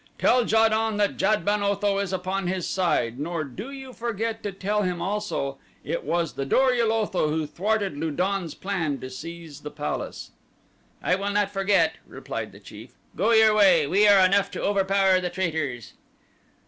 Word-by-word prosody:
Tell 245 -1 +3
Ja 225 0 +4
don 220 -1 0
that 205 -1 +1
Jad 215 0 +1
ben 205 0 +1
Otho 200 0 +1
is 200 -2 -2
upon 190 0 -2
his 185 -1 -2
side, 150 -10 0
nor 165 +2 -2
do 180 - -8
you 270 -2 -9
forget 225 -1 -3
to 205 - -4
tell 200 +2 -1
him 180 -3 -1
also 195 -10 -3 0.2
that - - -6
it - - -2
was 170 -2 -1
the 135 - -3
Dor 255 - +3
ul 235 -2 +2
Otho 210 -8 0
who 155 0 -1
thwarted 200 +4 -1
Lu 160 +3 -2
don's 180 +1 -2
plan 170 -8 -2
to 130 - -7
seize 165 +2 -9
the 150 - -6
palace." - - -5 0.7
"I - - +2
will 200 +2 -1
not 205 -1 0
forget," 195 -5 +2
replied - - -6
the - - -14
chief. - - -13 0.2
"Go - - +1
your 220 -1 +6
way. 190 -7 +5
We 200 +8 +3
are 195 -2 +7
enough 200 +1 +2
to - - -6
overpower 195 -1 +3
the 180 - -2
traitors." 160 - -3
195 Hz, 185 wpm, -25 LUFS, 165-210 Hz, 0.7 s, are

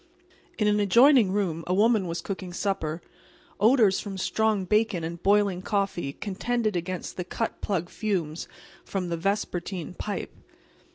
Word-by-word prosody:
In 210 - +2
an 210 0 +3
adjoining 235 +2 +6
room 180 -5 -1
a 180 - +1
woman 215 -2 +3
was 170 0 -4
cooking 185 -2 -5
supper. 175 -4 -2 0.6
Odors 215 -2 +5
from 195 -2 -6
strong 215 0 +1
bacon 210 -3 +1
and 170 +1 -5
boiling 200 -2 +3
coffee 195 -7 -1
contended 215 +3 -2
against 175 +1 -4
the 180 - -2
cut 220 +5 -4
plug 180 -4 -1
fumes 175 -7 -2 0.4
from 185 -3 -3
the 170 - -1
vespertine 185 -1 -2
pipe. 205 +2 -5
195 Hz, 140 wpm, -26 LUFS, 175-210 Hz, 0.6 s, adjoining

